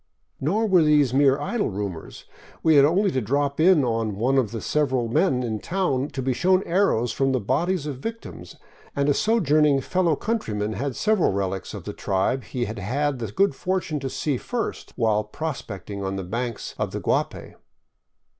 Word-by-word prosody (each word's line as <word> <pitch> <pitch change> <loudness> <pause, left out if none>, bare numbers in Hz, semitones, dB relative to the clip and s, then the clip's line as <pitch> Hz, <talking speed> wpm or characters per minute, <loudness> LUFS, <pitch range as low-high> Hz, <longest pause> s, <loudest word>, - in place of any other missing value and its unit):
Nor 200 +11 +1
were 190 -5 +4
these 150 -4 +4
mere 140 0 +4
idle 235 -3 -1
rumors; 100 -5 -6 0.4
we 160 - +5
had 140 -2 +7
only 190 +6 +2
to 130 - 0
drop 140 +5 -1
in 165 -2 +5
on 115 -4 -1
one 130 +6 +2
of 120 -5 0
several 130 -5 0
men 125 +2 +1
in 110 -3 -2
town 155 - -1
to 135 -3 -5
be 130 0 +1
shown 185 +7 +2
arrows 170 - +1
taken 135 - 0
from 135 - +2
the 130 - +1
bodies 150 - 0
of 140 -4 -5
victims, 225 +9 -7 0.4
and 140 0 +1
a - - +5
sojourn 165 -7 +2
ing 140 -2 +3
fellow 170 +3 +1
countryman 110 - -2
had 130 +4 -3
several 215 -4 +2
relics 95 -1 -3
of - - -7
the - - -6
tribe 100 +7 -1
he 125 -2 -3
had 110 +1 -6
had 135 +7 -1
the 115 -4 -4
good 195 - +2
fortune 180 0 -2
to 135 -1 -4
see 140 0 -1
first 240 - -4
while 110 -3 +1
prospecting 105 -6 -6
on 95 0 -2
the 95 - -4
banks 115 +5 -4
of - - -2
the - - -2
Guapay. - - -2
135 Hz, 190 wpm, -24 LUFS, 115-165 Hz, 0.4 s, had